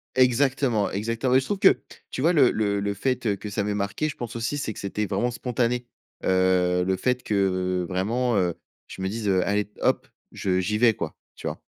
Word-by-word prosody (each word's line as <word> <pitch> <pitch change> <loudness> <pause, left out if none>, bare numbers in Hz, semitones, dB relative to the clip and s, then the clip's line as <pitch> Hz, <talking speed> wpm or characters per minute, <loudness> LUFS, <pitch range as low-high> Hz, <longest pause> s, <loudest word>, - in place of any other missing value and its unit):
Exactement, 130 -3 +2
exactement, 115 +5 -1
mais 130 - +7
je 135 - -4
trouve 200 -2 -2
que 195 - +5 0.3
tu - - -6
vois? 165 +5 +4
Le 140 -6 +5
le 100 -2 0
le 100 0 -1
fait 120 -2 -1
que 105 - -7
ça 105 +1 -1
m'ait 105 0 -1
marqué, 100 +9 -1
je - - -7
pense 120 -2 -6
aussi, 115 +5 -2
c'est 110 -6 -3
que - - -10
c'était 100 +2 -2
vraiment 105 +5 0
spontané. 120 0 -1 0.4
Heu, 90 -1 +3
le 95 0 +1
fait 125 +5 0
que 95 -3 0
vraiment, 115 +6 0
heu, 90 -4 +2 0.3
je - - -9
me 95 - -1
dise, 105 +1 -2
heu: 95 -1 +3
«Allez 105 0 0
hop, - - +1 0.3
je 95 -1 0
j'y 105 +3 0
vais 115 -1 +5
quoi», - - -5 0.2
tu - - -6
vois? - - -5
105 Hz, 215 wpm, -25 LUFS, 95-125 Hz, 0.4 s, mais